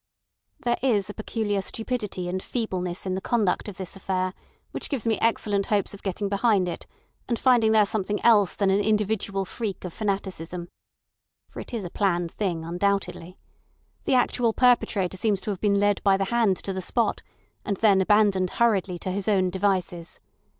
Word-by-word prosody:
"There 240 0 +1
is 210 -6 +1
a - - -11
peculiar 210 -2 -2
stupidity 215 -4 -3
and 185 +1 -2
feebleness 185 -7 -3
in 185 - -1
the 190 - -2
conduct 215 -3 0
of 190 - -10
this 190 -1 -6
affair 185 -1 -2 0.4
which - - -4
gives 270 -7 -3
me 225 -2 +1
excellent 205 -3 +1
hopes 205 -1 0
of 200 - -10
getting 200 +1 -2
behind 200 -2 +2
it 175 - -6 0.4
and 235 - +1
finding 240 -4 +4
there 215 -1 +5
something 205 0 -1
else 210 -5 +5
than 195 -2 +2
an 195 - +3
individual 205 -2 0
freak 205 -2 -5
of 175 - -6
fanaticism. 185 -4 -3 0.8
For - - -8
it - - -8
is 225 -6 -3
a 175 - -6
planned 175 -4 0
thing, 175 -6 -2
undoubtedly. 185 0 -1 0.7
The 265 - +2
actual 245 -2 +2
perpetrator 215 -7 +2
seems 205 0 +1
to 215 - -3
have 195 - -6
been 200 -1 +2
led 205 0 +2
by 195 -1 +4
the 195 - 0
hand 220 -6 +3
to 195 - -3
the 190 - -3
spot, 220 +3 0 0.4
and 200 - -2
then 200 -3 +4
abandoned 200 -2 +3
hurriedly 200 -6 +2
to 185 - -4
his 200 +2 -3
own 190 -4 +2
devices. 185 -3 -1
200 Hz, 180 wpm, -25 LUFS, 185-220 Hz, 0.8 s, there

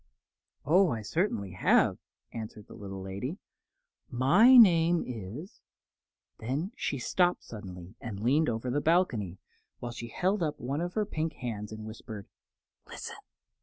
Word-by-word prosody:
"Oh, 180 +6 +5
I 110 -5 -3
certainly 105 - -1
have," 90 - +3 0.3
answered 110 -2 -7
the - - -13
little 95 -3 -7
lady. 100 - -4 0.7
"My 180 - +6
name 170 -6 +6
is 120 - -7 0.4
." - - -60
Then 140 - -2
she 145 - -2
stopped 175 +7 +1
suddenly 95 -4 -9
and 110 -4 -6
leaned 135 +8 +3
over 120 +2 -2
the 145 +3 +1
balcony, 125 - +1 0.4
while 120 - -5
she 120 0 -7
held 185 - 0
up 155 -3 -1
one 135 +6 -2
of 175 +1 -4
her 215 -1 +1
pink 160 -4 -2
hands 110 -4 -5
and 110 0 -7
whispered: 110 -2 -8 0.6
"Listen!" - - -7
125 Hz, 145 wpm, -30 LUFS, 110-170 Hz, 0.7 s, My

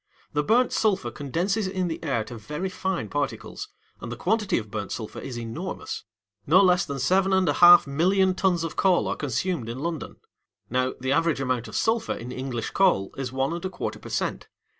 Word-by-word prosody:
The 150 - +2
burnt 235 +11 +3
sulphur 190 - +1
condenses 175 - -1
in 185 -1 -1
the 165 - -5
air 135 -8 0
to 120 - -9
very 150 - -4
fine 190 0 -2
particles, 145 - -4 0.3
and - - -7
the - - -3
quantity 220 -3 +1
of 110 -3 -5
burnt 105 -2 -4
sulphur 110 -2 -5
is 125 -3 -6
enormous. 115 -1 -5 0.4
No 170 +6 +6
less 180 -1 +4
than 140 - -4
seven 185 +8 +2
and 190 -1 +3
a 145 - +3
half 175 +5 +8
millions 185 +7 +2
of - - -4
tons 180 -4 +2
of 165 -2 -4
coals 185 -2 +3
are - - -1
consumed 140 -1 -2
in 120 - -5
London. 160 +2 -4 0.6
Now, 130 +1 0
the 130 +1 -2
average 165 +1 +2
amount 130 -3 -1
of - - -9
sulphur 225 0 +1
in 120 +2 -7
English 125 -3 -4
coal 180 - +2
is 135 -3 -4
one 135 +3 -1
and 170 - -5
a 190 - -2
quarter - - -5
per - - -10
cent. - - -2
155 Hz, 205 wpm, -25 LUFS, 130-190 Hz, 0.6 s, half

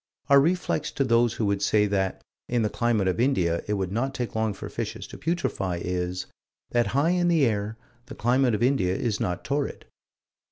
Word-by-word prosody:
Our 140 0 +7
reflex 165 -1 0
to 140 - +1
those 120 -2 +3
who 110 - -1
would 100 -1 0
say 105 +1 +3
that, 95 -2 -1 0.3
in 120 -2 +1
the 105 - 0
climate 115 -5 +1
of 95 - 0
India, 90 -10 +1
it 105 - 0
would 95 -3 -2
not 130 +6 -1
take 120 -2 -3
long 110 -1 0
for - - -7
fishes - - -5
to - - -10
putrefy, 135 - -1
is 90 +1 -3 0.5
that 120 -1 +2
high 155 +5 +3
in 180 -1 +2
the 165 -5 +4
air, 110 -1 -1 0.3
the 140 - -9
climate 125 +1 +2
of 105 - -1
India 120 -9 +2
is 110 -2 -1
not 90 -1 -2
torrid. 140 +1 -2
115 Hz, 200 wpm, -26 LUFS, 100-135 Hz, 0.5 s, Our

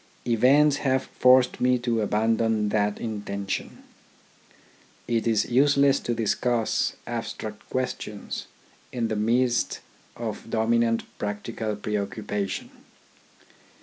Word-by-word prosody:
Events 135 +5 +4
have 130 -1 +1
forced 125 0 +3
me 125 0 +4
to 120 -2 0
abandon 110 0 +1
that 105 -1 +1
inten 100 -3 -5
tion. - - -4 1.2
It 115 -1 0
is 110 -2 +2
useless 140 +2 +4
to 120 - -2
discuss 115 +1 0
abstract 105 -1 -6
questions 125 -5 -4 0.4
in 120 -3 -1
the 110 - -1
midst 120 +3 +1 0.3
of 115 -1 -6
dominant 115 0 +2 0.2
practical 105 +1 -3
preoccupation. 105 -1 -3
115 Hz, 100 wpm, -26 LUFS, 105-125 Hz, 1.2 s, Events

